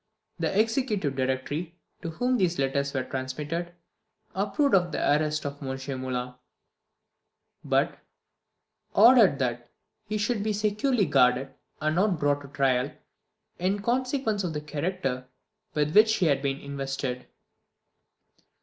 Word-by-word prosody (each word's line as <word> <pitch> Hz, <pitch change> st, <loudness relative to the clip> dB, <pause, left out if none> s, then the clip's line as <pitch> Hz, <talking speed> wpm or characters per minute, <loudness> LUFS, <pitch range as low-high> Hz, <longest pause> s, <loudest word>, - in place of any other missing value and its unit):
The 195 Hz, -, 0 dB
Executive 220 Hz, -, 0 dB
Directory, 135 Hz, +6 st, -2 dB, 0.3 s
to 165 Hz, -, -4 dB
whom 245 Hz, +10 st, 0 dB
these 180 Hz, -4 st, +1 dB
letters 140 Hz, +1 st, 0 dB
were 130 Hz, -2 st, -1 dB
transmitted, 150 Hz, +7 st, -4 dB, 0.6 s
approved 205 Hz, +9 st, +1 dB
of 175 Hz, -3 st, +4 dB
the -, -, -3 dB
arrest 150 Hz, +1 st, +1 dB
of 145 Hz, +1 st, -5 dB
M. 135 Hz, -1 st, -4 dB, 0.2 s
Moulin; 125 Hz, -1 st, -3 dB, 1.3 s
but -, -, +1 dB, 1.0 s
ordered 225 Hz, -, +7 dB
that 120 Hz, -2 st, -2 dB, 0.4 s
he 215 Hz, 0 st, -1 dB
should 215 Hz, +1 st, 0 dB
be 215 Hz, +1 st, 0 dB
securely 210 Hz, +3 st, +1 dB
guarded, 130 Hz, -1 st, +3 dB, 0.3 s
and 155 Hz, +1 st, 0 dB
not 195 Hz, -2 st, +2 dB
brought 145 Hz, -1 st, +1 dB
to 140 Hz, -, -10 dB
trial, 135 Hz, -1 st, +1 dB, 0.7 s
in 195 Hz, +3 st, 0 dB
consequence 250 Hz, -3 st, 0 dB
of 170 Hz, -3 st, -2 dB
the 150 Hz, -, -3 dB
character 150 Hz, -4 st, -3 dB, 0.5 s
with 150 Hz, 0 st, +1 dB
which 220 Hz, +1 st, +6 dB
he 180 Hz, -, +1 dB
had 140 Hz, -3 st, +2 dB
been 135 Hz, -1 st, -1 dB
invested. 135 Hz, -2 st, -4 dB
155 Hz, 130 wpm, -27 LUFS, 135-205 Hz, 1.3 s, ordered